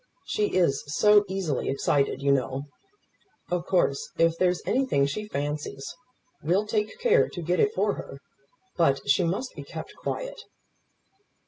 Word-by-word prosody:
She 420 Hz, -1 st, -1 dB
is 170 Hz, -7 st, +2 dB
so 210 Hz, +7 st, +5 dB
easily 185 Hz, -7 st, -2 dB
excited, 140 Hz, 0 st, 0 dB
you 140 Hz, -, +3 dB
know. 135 Hz, 0 st, 0 dB, 0.9 s
Of 180 Hz, 0 st, -1 dB
course, 175 Hz, -7 st, +1 dB
if 165 Hz, 0 st, +3 dB
there's 180 Hz, +1 st, +1 dB
anything 255 Hz, -, +2 dB
she 210 Hz, +10 st, -4 dB
fancies, 145 Hz, -3 st, -4 dB, 0.5 s
we'll 180 Hz, +7 st, +1 dB
take 210 Hz, 0 st, -2 dB
care 480 Hz, -1 st, +4 dB
to 175 Hz, -, -6 dB
get 175 Hz, +3 st, 0 dB
it 420 Hz, -, +4 dB
for -, -, +1 dB
her; -, -, -8 dB, 0.6 s
but 140 Hz, -6 st, +2 dB
she 145 Hz, +7 st, +4 dB
must 195 Hz, +10 st, -2 dB
be -, -, -7 dB
kept -, -, -8 dB
quiet." -, -, -4 dB
175 Hz, 145 wpm, -26 LUFS, 140-210 Hz, 0.9 s, so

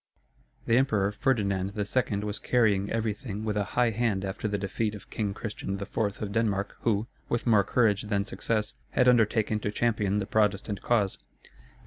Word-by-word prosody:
The 115 Hz, -, +3 dB
Emperor 105 Hz, -7 st, +2 dB
Ferdinand 100 Hz, -6 st, 0 dB
II. 105 Hz, 0 st, 0 dB
was 105 Hz, 0 st, -3 dB
carrying 105 Hz, -5 st, +2 dB
everything 110 Hz, -1 st, -3 dB
with 105 Hz, -2 st, -1 dB
a 105 Hz, -, +1 dB
high 120 Hz, -2 st, +4 dB
hand 105 Hz, -3 st, 0 dB
after 95 Hz, +3 st, -3 dB
the 100 Hz, -1 st, -1 dB
defeat 105 Hz, +2 st, -2 dB
of 105 Hz, -, -12 dB
King 100 Hz, -3 st, -2 dB
Christian 100 Hz, -3 st, -4 dB
IV. 100 Hz, -, -8 dB, 0.3 s
of 100 Hz, -, -4 dB
Denmark, 100 Hz, -2 st, 0 dB
who, 110 Hz, -2 st, +1 dB, 0.2 s
with 120 Hz, -, -1 dB
more 110 Hz, -4 st, +5 dB
courage 105 Hz, -4 st, +2 dB
than 100 Hz, -2 st, -1 dB
success, 110 Hz, -1 st, -2 dB, 0.2 s
had 125 Hz, -, +3 dB
undertaken 110 Hz, -3 st, +3 dB
to 105 Hz, -, -2 dB
champion 105 Hz, -2 st, 0 dB
the 100 Hz, -, -1 dB
Protestant 105 Hz, -1 st, 0 dB
cause. 105 Hz, -5 st, +1 dB
105 Hz, 165 wpm, -28 LUFS, 100-115 Hz, 0.3 s, more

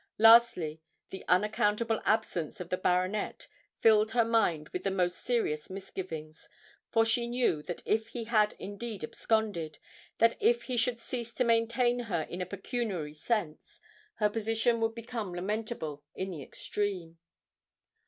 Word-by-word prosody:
Lastly, 220 Hz, -9 st, +6 dB, 0.3 s
the 190 Hz, -, -7 dB
unaccountable 210 Hz, +4 st, +2 dB
absence 215 Hz, -7 st, 0 dB
of 180 Hz, -1 st, -6 dB
the 185 Hz, -, 0 dB
baronet 185 Hz, -, 0 dB, 0.3 s
filled 220 Hz, -1 st, +5 dB
her 235 Hz, -2 st, +4 dB
mind 175 Hz, -10 st, +2 dB
with 180 Hz, -, -4 dB
the 195 Hz, -, +1 dB
most 180 Hz, -2 st, 0 dB
serious 155 Hz, -12 st, 0 dB
misgivings; 175 Hz, -5 st, -7 dB, 0.4 s
for 225 Hz, -1 st, +3 dB
she 235 Hz, +1 st, +1 dB
knew 240 Hz, -10 st, +1 dB
that 175 Hz, +3 st, -6 dB
if 220 Hz, +1 st, +1 dB
he 235 Hz, 0 st, -5 dB
had 215 Hz, -2 st, +2 dB
indeed 205 Hz, -1 st, -6 dB
absconded, 190 Hz, -4 st, -1 dB, 0.4 s
and 230 Hz, +1 st, +5 dB
if 470 Hz, +3 st, +3 dB
he 255 Hz, -, -2 dB
should 235 Hz, 0 st, +1 dB
cease 235 Hz, -1 st, -5 dB
to 255 Hz, -, +2 dB
maintain 235 Hz, +1 st, +2 dB
her 170 Hz, -4 st, 0 dB
in 175 Hz, +3 st, -6 dB
a 180 Hz, -, -3 dB
pecuniary 195 Hz, -, -3 dB
sense, 155 Hz, -1 st, -3 dB, 0.4 s
her 210 Hz, -, +3 dB
position 225 Hz, +2 st, +1 dB
would 225 Hz, 0 st, 0 dB
become 230 Hz, -5 st, -5 dB
lamentable 185 Hz, -6 st, -3 dB
in 190 Hz, 0 st, -3 dB
the 160 Hz, -5 st, -6 dB
extreme. 180 Hz, +1 st, -4 dB
210 Hz, 145 wpm, -30 LUFS, 180-230 Hz, 0.4 s, Lastly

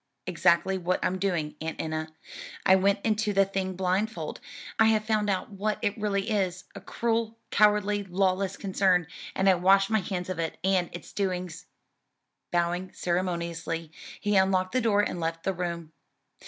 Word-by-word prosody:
"Exactly 180 Hz, +2 st, +2 dB
what 180 Hz, +1 st, 0 dB
I'm 185 Hz, 0 st, 0 dB
doing, 175 Hz, -6 st, -1 dB
Aunt 160 Hz, 0 st, -4 dB
Enna. 155 Hz, 0 st, -3 dB, 0.5 s
I 190 Hz, -, +7 dB
went 200 Hz, +1 st, +2 dB
into 215 Hz, -1 st, +1 dB
the 195 Hz, 0 st, +4 dB
thing 190 Hz, -1 st, -3 dB
blindfold; 190 Hz, +4 st, -1 dB, 0.4 s
I 220 Hz, -, +7 dB
have 215 Hz, -1 st, +3 dB
found 215 Hz, -1 st, +1 dB
out 190 Hz, +1 st, -1 dB
what 205 Hz, +2 st, -1 dB
it 205 Hz, -, +1 dB
really 205 Hz, 0 st, -1 dB
is 185 Hz, -3 st, 0 dB
a -, -, -9 dB
cruel, 230 Hz, -1 st, -1 dB
cowardly, 210 Hz, -1 st, +3 dB
lawless 190 Hz, +1 st, 0 dB
concern 190 Hz, -3 st, +2 dB, 0.3 s
and 190 Hz, -, +1 dB
I 190 Hz, -, +7 dB
wash 195 Hz, +3 st, +4 dB
my 220 Hz, -, +4 dB
hands 180 Hz, -2 st, -4 dB
of 185 Hz, -2 st, -3 dB
it 165 Hz, -1 st, -2 dB
and 185 Hz, -2 st, +2 dB
its 175 Hz, -, -9 dB
doings." 180 Hz, -4 st, -3 dB, 0.8 s
Bowing 175 Hz, +1 st, 0 dB
ceremoniously 170 Hz, -2 st, -2 dB, 0.3 s
he 205 Hz, 0 st, 0 dB
unlocked 190 Hz, -1 st, +3 dB
the 255 Hz, -, +1 dB
door, 210 Hz, -3 st, +3 dB
and 195 Hz, -, -2 dB
left 165 Hz, 0 st, -3 dB
the 195 Hz, -, 0 dB
room. 170 Hz, -3 st, -4 dB
190 Hz, 165 wpm, -27 LUFS, 175-205 Hz, 0.8 s, I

